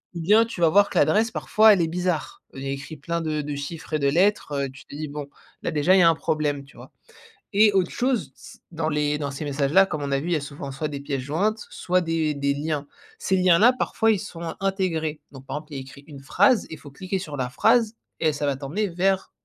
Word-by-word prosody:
ou 170 - -4
bien 210 +7 +5
tu 225 -6 -8
vas 165 - +5
voir 200 +4 +4
que - - -4
l'adresse 220 +2 +3
parfois 220 0 +4
elle 185 - +1
est 165 - +1
bizarre. 175 -1 -2
Heu, - - -7
il - - -7
y - - -3
a - - -1
écrit 145 +3 -7
plein 170 +3 -3
de 155 -1 -2
de 145 0 -5
chiffres 155 +3 -7
et 155 - +1
de 140 - +1
lettres, 175 +1 +2
heu, - - -5
tu 135 +1 -14
te - - -11
dis: 155 +1 -4
«Bon, 145 0 -6 0.3
là - - -2
déjà 155 +5 +3
il 190 - +5
y - - +6
a 170 - +7
un 165 - +3
problème», 150 -3 -1
tu 140 - -20
vois? - - -13 0.6
Et 210 0 +5
autre 185 -2 +2
chose 245 -3 -1
s - - -14
dans 160 -1 -2
les 150 0 0
dans 145 -2 -3
ces 140 +3 -6
messages 140 0 -1
là 195 +1 +6
comme 150 -4 -4
on 140 - -3
a 135 - +2
vu 160 - -5
il 175 - 0
y - - +3
a 155 - 0
souvent 140 -1 -7
soit 150 +3 -3
des 145 -2 -6
pièces 140 -2 -3
jointes, 205 - -1
soit 185 +1 0
des 165 -3 -1
des 140 0 0
liens. 145 0 -3 0.3
Ces 190 - 0
liens 180 -2 +5
là 240 +6 +6
parfois 225 -2 +1
ils 205 - +1
sont 170 -4 -6
intégrés, 180 -6 -1
donc 135 -1 -13
par - - -4
exemple 150 0 -10
il 140 - -4
y - - -4
a - - -6
écrit 135 +2 -13
une 145 -3 -11
phrase, 205 - +3
il 160 - -7
faut 145 - -13
cliquer 185 +7 -4
sur 155 -6 -6
la 125 -1 -2
phrase, 225 - +2 0.2
et 155 -2 +2
ça 145 - -3
va 140 -1 0
t'emmener 155 +10 -2
vers, 190 +2 0
160 Hz, 280 wpm, -24 LUFS, 145-190 Hz, 0.6 s, a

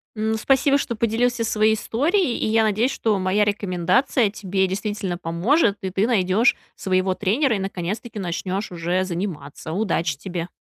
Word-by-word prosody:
Ну, 220 +1 -1
спасибо, 270 +4 +3
что 240 -4 -3
поделился 235 +2 0
своей 220 0 +2
историей, 295 - 0
и - - -1
я 220 +1 +3
надеюсь, 220 +4 +1
что 215 -3 0
моя 190 +3 +2
рекомендация 205 +4 +1
тебе 190 -2 -1
действительно 195 -1 -3
поможет, 200 - +1
и 190 - -3
ты 195 +4 +1
найдешь 215 +1 +3 0.2
своего 185 -1 0
тренера 225 +7 +1
и - - -2
наконец-таки 195 +4 -4
начнешь 185 +2 -3
уже 175 +2 -1
заниматься. 170 -5 -5
Удачи 170 -5 -1
тебе. 175 +1 -5
205 Hz, 155 wpm, -22 LUFS, 185-225 Hz, 0.2 s, спасибо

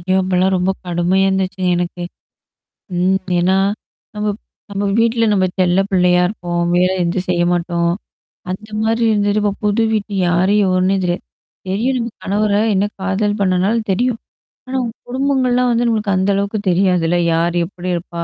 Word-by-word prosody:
ஐயோ! 185 +2 -1
அப்பலாம் 185 0 +1
ரொம்ப 180 +1 +1 0.2
கடுமையா 175 +2 +1
இருந்துச்சுங்க 190 -1 -1
எனக்கு. 175 0 -3 0.9
ம். 185 +2 +2 0.2
ஏன்னா. 185 +2 +2 0.6
நம்மப் 210 0 -2 0.3
நம்ம 200 0 -3
வீட்ல 230 0 +2
நம்ம 190 -2 +2
செல்ல 180 0 +3
பிள்ளையா 180 -2 +3
இருப்போம். 175 -3 -3
வேல 180 +1 +3
எதும் 175 +2 -1
செய்ய 175 -1 +2
மாட்டோம். 170 -1 0 0.6
அந்த 210 +4 -7
மாரி 225 +1 +1
இருந்ததுட்டு 205 0 +1
இப்ப 205 -1 +1
புது 210 +2 +2
வீட்டு 210 -1 -2
யாரு 180 +3 +2
எவருன்னே 185 +1 +2
தெரியாது. 175 0 -1 0.5
தெரியும் 230 +8 0
நம்ம 235 -1 -2
கணவர 205 +1 0 0.2
என்ன 195 +1 +2 0.2
காதல் 200 +2 0
பண்ணனால 185 +3 +2 0.2
தெரியும். 235 +4 0 0.5
ஆனா 260 +1 -2
உங் 230 - -4 0.2
குடும்பங்கள்லாம் 255 -1 +1
வந்து 235 +1 +1
நமக்கு 215 -3 0
அந்த 190 +2 +1
அளவுக்கு 200 +2 -1
தெரியாதுல்ல? 175 -2 +2 0.2
யார் 170 +1 +1
எப்படி 180 0 -7
இருப்பா? 170 0 -5
190 Hz, 150 wpm, -17 LUFS, 180-215 Hz, 0.9 s, செல்ல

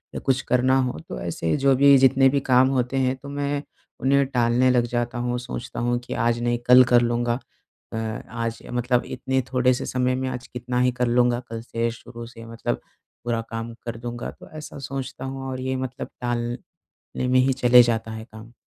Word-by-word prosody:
या - - -2
कुछ 135 0 +2
करना 130 +1 +3
हो। 125 -11 -2
तो 60 - -5
ऐसे 80 +5 -1
जो 135 -1 +4
भी 140 +1 +7
जितने 135 0 +5
भी 140 +1 +1
काम 130 +1 +6
होते 130 0 0
हैं, 130 0 +1
तो 140 +1 -11
मैं 145 0 -2 0.4
उन्हें 140 +1 +3
टालने 125 0 +2
लग 120 -1 +3
जाता 120 0 -1
हूँ, 120 0 -1
सोचता 125 -1 -6
हूँ 120 +1 +1
कि 125 - -7
आज 115 +1 +1
नहीं 120 0 +1
कल 125 +1 +9
कर 120 - +7
लूँगा। 120 0 0 0.5
अ 110 0 -3 0.2
आज 115 0 -3
मतलब 125 0 +1
इतने 130 +1 -1
थोड़े-से 125 0 +2
समय 125 0 0
में 130 0 -2
आज 125 -1 -6
कितना 125 0 -3
ही 125 0 +3
कर 125 0 -1
लूँगा, 120 0 +3
कल 115 -2 -7
से 115 0 -2
शुरू 120 0 -10
से 115 -1 -12
मतलब 115 0 -3 0.4
पूरा 115 -1 -1
काम 115 +1 -5
कर 115 -1 -4
दूँगा। 120 +1 -5
तो - - -15
ऐसा 155 - -8
सोचता 130 -1 -5
हूँ, 135 0 -5
और 130 0 -4
ये 130 0 -2
मतलब 130 -1 -4
टाल 120 0 -2 0.6
ने 125 - 0
में 130 0 +4
ही 130 +1 +3
चले 125 -1 +6
जाता 115 -1 -1
है 110 0 -7
काम। 110 0 -13
125 Hz, 205 wpm, -24 LUFS, 120-130 Hz, 0.6 s, कल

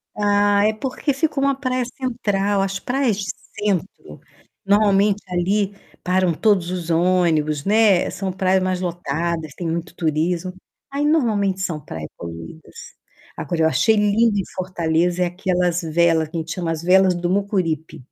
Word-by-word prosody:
Ah, 205 0 +3
é 220 - +1
porque 260 +6 -2
fica 300 +1 -1
uma 275 0 +2
praia 255 -2 -1
central. 205 -6 -1
As 195 0 -2
praias 250 -4 0
de 200 -2 -3 0.3
centro, 190 - -3 0.4
normalmente 205 0 +3
ali 190 +3 0 0.3
param 185 -1 +2
todos 195 -3 +2
os 180 -2 -4
ônibus, 165 -4 +1
né, 210 -3 +4
são 190 0 -3
praias 190 0 +1
mais 185 -1 -1
lotadas, 170 -2 -3
tem 175 - -4
muito 165 +1 -4
turismo, 170 +3 -1 0.4
aí 285 +1 -1
normalmente 215 -11 +1
são 170 -5 -2
praias 80 -7 -7
poluídas. 85 - -10 0.6
Agora 170 -2 -3
eu - - +5
achei 160 +9 +3
lindo 210 +1 +2
em 195 - 0
Fortaleza 175 -1 0
é - - +2
aquelas 180 -1 0
vela, 165 0 +2
que 165 - -5
a - - 0
gente 160 0 -4
chama 175 -3 -3
as 160 0 -4
Velas 185 0 +4
do 175 0 -2
Mucuripe. 175 -6 -1
185 Hz, 155 wpm, -21 LUFS, 170-205 Hz, 0.6 s, eu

